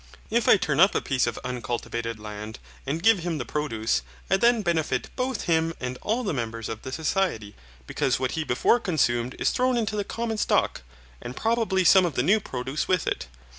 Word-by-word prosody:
If 235 0 +1
I - - +8
turn 150 -5 -1
up 190 +3 +6
a - - +3
piece 130 -3 0
of 120 - -3
uncultivated 120 -2 -4
land, 105 0 -7 0.3
and 160 +5 -2
give 225 -3 +5
him 170 -2 -2
the 125 - -4
produce, 115 - -1 0.3
I 190 - +5
then 235 +1 +3
benefit 170 -4 -1
both 260 0 -2
him 165 0 +1
and 125 0 -4
all 230 +4 -1
the 200 - -1
members 115 -3 -4
of 110 -1 -5
the 130 - -7
society, 155 - -1 0.3
because 125 - 0
what 130 -1 -1
he 160 - -2
before 155 - +2
consumed 130 - 0
is - - +1
thrown 255 0 +1
into 215 -2 -1
the 205 - 0
common 225 0 -3
stock, - - +1 0.4
and 120 +1 -7
probably 225 -4 +1
some 185 0 +6
of 160 - -5
the 125 - +1
new 195 +8 +4
produce 135 -4 -4
with 185 -1 +1
it. - - -2
155 Hz, 205 wpm, -26 LUFS, 125-200 Hz, 0.4 s, I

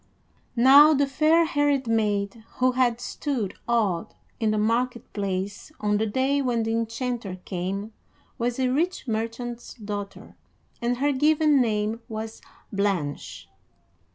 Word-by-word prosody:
Now 280 +5 +8
the 285 +1 +3
fair 310 +5 +3
haired 290 -3 +1
maid 215 -1 0
who 255 0 +3
had 245 -2 +1
stood 245 -8 -3
awed 215 -5 0 0.2
in 220 -2 +1
the 215 - +1
market 235 +3 0
place 200 +4 -3
on 210 0 +1
the 220 +1 0
day 265 +6 +1
when 240 -4 0
the 225 - -1
enchanter 230 -2 -2
came 195 +4 -4 0.5
was 240 +1 -1
a 260 -1 +1
rich 315 +3 -1
merchant's 230 +2 -4
daughter, 205 -3 -7 0.5
and 240 +1 0
her 285 +3 +2
given 300 0 +3
name 215 0 0
was 220 0 -6 0.3
Blanche. 195 -8 -2
230 Hz, 130 wpm, -25 LUFS, 210-260 Hz, 0.5 s, Now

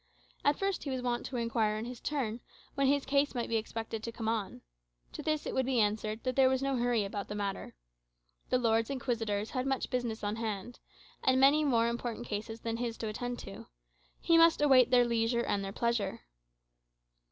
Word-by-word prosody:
At 290 0 +3
first 390 -1 -1
he 285 - -4
was 260 -2 -3
wont 240 -1 -1
to 265 - -7
inquire, 225 -2 0
in 220 - -4
his 245 -1 -7
turn, 245 -6 -2 0.3
when 275 -1 +1
his 280 0 +2
case 280 +1 +1
might 240 - -2
be 230 - +2
expected 225 0 -4
to 230 - -5
come 225 -1 -5
on. 220 -3 -2 0.5
To - - -6
this 310 -1 -1
it - - -3
would 260 -1 0
be 260 -3 +2
answered, 215 +1 0
that 255 -1 -1
there 265 -1 +5
was 260 0 0
no 275 0 +1
hurry 240 -3 +1
about 200 0 -5
the 210 - -5
matter. 200 -1 -4 0.7
The 255 - +3
Lords 225 -2 +2
Inquisitors 225 -6 -2
had 255 0 -2
much 270 -1 -1
business 240 -4 -2
on 205 +1 -1
hand, 225 +1 -4 0.4
and 260 0 +4
many 285 +3 +5
more 235 -5 +3
important 235 0 -3
cases 220 +1 -5
than 230 0 -2
his 235 -1 -3
to 220 - -3
attend 245 +3 -4
to; 195 - -10 0.5
he 335 -1 +4
must 330 0 +6
await 265 -4 +6
their 245 -1 +5
leisure 235 0 +1
and 200 -3 -1
their 195 - -4
pleasure. 235 -3 -1
235 Hz, 205 wpm, -31 LUFS, 220-260 Hz, 0.7 s, must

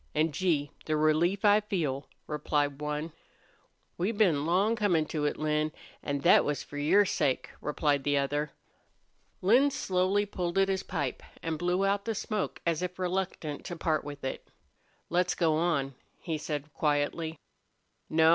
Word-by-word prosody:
An', 155 +1 +2
Gee! 150 -3 0
the 155 -1 0
relief 165 +6 +2
I 205 0 +7
feel!" 155 -10 -2 0.2
replied 145 -1 -1
one. 150 +2 -3 0.9
"We've 205 +5 0
been 160 -9 +3
long 195 +6 +3
comin' 180 -8 +2
to 150 -2 -1
it, 145 - 0
Lin, 155 0 0 0.3
an' 140 -1 -2
thet - - +6
was 145 -2 -2
for 145 - -7
your 185 +8 +5
sake," 145 -7 0
replied 145 -1 +1
the 145 0 +2
other. 145 +2 0 0.9
Lin 245 +9 +5
slowly 190 -3 +1
pulled 180 -3 -3
at 195 0 +4
his 190 -1 0
pipe 145 -9 -3 0.2
and 160 -2 -2
blew 180 +2 +1
out 200 0 +1
the 225 -1 -1
smoke 210 -1 -3
as 170 -1 +1
if 180 0 -3
reluctant 180 -5 -2
to 175 - -4
part 160 -1 0
with 145 0 -8
it. 130 - -4 0.6
"Let's 180 +1 +2
go 165 -3 +2
on," 155 -4 +1 0.3
he 160 -3 -3
said, 150 -1 -4
quietly. 155 +2 0 0.7
"No. 160 0 +5
160 Hz, 160 wpm, -29 LUFS, 150-185 Hz, 0.9 s, I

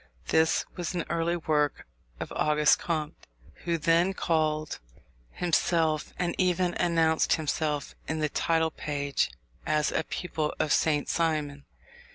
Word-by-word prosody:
This 160 0 +3
was 175 0 -4
an 170 - -1
early 170 +1 0
work 150 -3 0 0.3
of - - -5
Auguste 150 0 +3
Comte, 155 -3 -4 0.4
who 170 -1 +1
then 170 +4 +2
called 155 -3 0 0.5
himself, 160 - +1
and 175 -1 -1
even 180 -1 +2
announced 165 -2 +3
himself 150 -2 -1
in 160 - -2
the 155 -1 +1
title 160 +2 +1
page 145 -2 -1 0.3
as, 150 -1 +1
a - - 0
pupil 155 -4 -3
of 150 - +2
Saint 150 -3 +2
Simon. 150 -4 -1
160 Hz, 130 wpm, -28 LUFS, 150-170 Hz, 0.5 s, This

